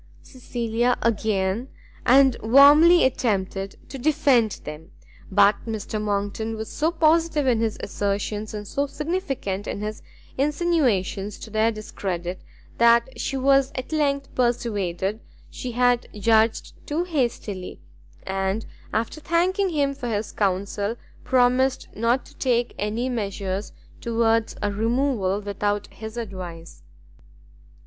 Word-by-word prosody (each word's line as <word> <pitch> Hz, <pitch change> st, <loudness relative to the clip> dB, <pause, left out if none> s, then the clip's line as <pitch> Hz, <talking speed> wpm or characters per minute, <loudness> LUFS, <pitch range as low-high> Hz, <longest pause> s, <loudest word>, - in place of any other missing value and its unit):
Cecilia 240 Hz, -1 st, -1 dB
again 215 Hz, 0 st, 0 dB, 0.4 s
and 265 Hz, 0 st, +6 dB
warmly 290 Hz, +8 st, +7 dB
attempted 195 Hz, -6 st, -1 dB
to 270 Hz, -, -7 dB
defend 270 Hz, -6 st, +3 dB
them; 150 Hz, +2 st, -8 dB, 0.4 s
but 200 Hz, +1 st, +5 dB
Mr 215 Hz, -1 st, -3 dB
Monckton 205 Hz, +2 st, -2 dB
was 220 Hz, 0 st, -6 dB
so 310 Hz, +2 st, +1 dB
positive 325 Hz, -2 st, +2 dB
in 245 Hz, -4 st, +3 dB
his 225 Hz, -1 st, -1 dB
assertions, 205 Hz, +1 st, -2 dB
and 210 Hz, -1 st, -6 dB
so 280 Hz, +6 st, -1 dB
significant 275 Hz, -, -3 dB
in 200 Hz, -, -4 dB
his 215 Hz, 0 st, -5 dB, 0.4 s
insinuations 270 Hz, -, +1 dB
to 220 Hz, -, -10 dB
their 220 Hz, +1 st, +2 dB
discredit, 185 Hz, -4 st, -5 dB, 0.4 s
that 235 Hz, +2 st, +4 dB
she 270 Hz, -, -2 dB
was 275 Hz, 0 st, +3 dB
at 255 Hz, +3 st, -5 dB
length 280 Hz, -3 st, 0 dB
persuaded 210 Hz, -5 st, -1 dB, 0.3 s
she 250 Hz, -2 st, -6 dB
had 245 Hz, 0 st, +2 dB
judged 220 Hz, +2 st, +2 dB
too 310 Hz, +4 st, 0 dB
hastily, 235 Hz, -, -3 dB, 0.4 s
and, 195 Hz, +3 st, -2 dB, 0.3 s
after 230 Hz, +8 st, -2 dB
thanking 370 Hz, +5 st, +1 dB
him 285 Hz, -4 st, 0 dB
for 270 Hz, -3 st, -6 dB
his 215 Hz, -2 st, -2 dB
counsel, 200 Hz, +2 st, -1 dB, 0.3 s
promised 255 Hz, +1 st, +2 dB
not 235 Hz, +4 st, +1 dB
to -, -, -17 dB
take 245 Hz, -2 st, +1 dB
any 215 Hz, +4 st, -1 dB
measures 200 Hz, -4 st, -3 dB, 0.3 s
towards 230 Hz, -1 st, +1 dB
a 205 Hz, -, +1 dB
removal 220 Hz, -2 st, 0 dB
without 205 Hz, 0 st, -2 dB
his 220 Hz, +1 st, -8 dB
advice. 180 Hz, -7 st, -7 dB
230 Hz, 120 wpm, -24 LUFS, 205-270 Hz, 0.4 s, warmly